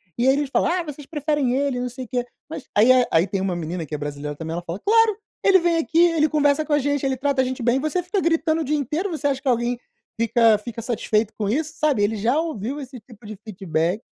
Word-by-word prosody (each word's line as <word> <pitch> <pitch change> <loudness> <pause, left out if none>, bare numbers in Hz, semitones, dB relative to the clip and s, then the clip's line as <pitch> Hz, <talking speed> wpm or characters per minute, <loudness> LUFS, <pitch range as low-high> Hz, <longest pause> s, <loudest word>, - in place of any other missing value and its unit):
E 240 - +1
aí 265 - +6
eles 290 -1 -1
falam: - - +2
"Ah, 360 0 0
vocês 295 -3 -9
preferem 295 -4 0
ele 275 -1 0
e - - -2
não 250 - -2
sei 255 +1 -7
o - - -16
quê". 250 0 -1 0.3
Mas 285 -4 -7
aí 225 +5 +6
é 255 -1 +4
aí 165 +2 +4
tem 195 0 -2
uma 190 -2 -1
menina, 170 +1 -4
que 150 - -5
é - - -3
brasileira 145 0 -5
também, 160 +1 -6
ela 175 - -4
fala: 170 +3 -5
"Claro, 445 -1 +4 0.3
ele 390 -1 +6
vem 340 -1 +1
aqui, 325 0 -1
ele 330 -3 +4
conversa 290 0 +2
com 305 - -1
a - - +5
gente, 285 0 -1
ele 265 -1 0
trata 275 0 +1
a - - 0
gente 255 -1 -4
bem, 245 +3 +2
você 310 +5 -1
fica 375 +2 -1
gritando 325 -1 +1
o - - -1
dia 300 +3 0
inteiro. 305 - -2
Você 310 -3 -5
acha 270 -2 -1
que - - -7
alguém 240 -1 +1 0.4
fica 230 -1 +4
fica 230 +1 -7
satisfeito 220 -2 0
com 205 -2 -1
isso?" 305 +6 -1
Sabe, 295 -9 +2
ele 215 +2 +1
já 235 +8 +1
ouviu 285 -4 -3
esse 260 -2 -9
tipo 215 0 -17
de 215 0 -7
feedback 185 -2 -2
260 Hz, 265 wpm, -22 LUFS, 215-305 Hz, 0.4 s, aí